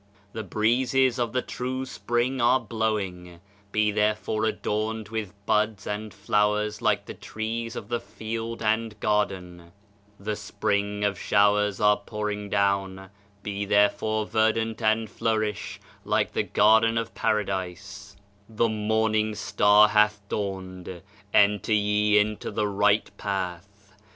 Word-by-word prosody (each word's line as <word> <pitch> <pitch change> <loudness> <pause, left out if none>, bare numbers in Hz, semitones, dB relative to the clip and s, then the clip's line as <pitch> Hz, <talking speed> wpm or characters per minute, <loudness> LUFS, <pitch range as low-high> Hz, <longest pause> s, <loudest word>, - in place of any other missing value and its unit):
The 110 - -4
Breezes 120 +5 +1
of 120 -2 0
the 125 +1 -1
true 130 +1 -4
Spring 120 +5 -1
are 125 +2 +4
blowing; 95 -7 -3 0.3
be 110 0 +2
therefore 105 +1 0
adorned 110 0 -2
with 110 -3 -4
buds 105 -1 +1
and 105 +1 -4
flowers 105 +2 0
like - - +1
the - - -7
trees 115 +2 -5
of - - -6
the 120 -1 -1
field 115 0 -6
and 110 0 0
garden 95 -5 -1 0.6
I - - -17
The 105 +1 -2
Spring 100 0 -1
Showers 105 +1 +2
are 105 0 +4
pouring 105 -1 -4
down, 95 -1 0 0.3
be 100 -1 -3
therefore 105 +2 +2
verdant 110 +1 0
and 110 0 +2
flourish, 110 -3 -2 0.2
like - - 0
the - - +1
Garden 110 +2 +4
of 115 0 -3
Paradise 100 -1 -3 0.3
I 110 - -16
The 115 +1 +2
Morning 110 0 0
Star 105 +1 +5
hath 105 0 +3
dawned 95 -3 -4
I 90 -2 -8 0.4
Enter 105 +1 +3
ye 105 0 +3
into 105 0 0
the 105 -1 -1
Right 100 +1 +1
Path! 100 +1 -5
105 Hz, 130 wpm, -26 LUFS, 100-110 Hz, 0.6 s, Star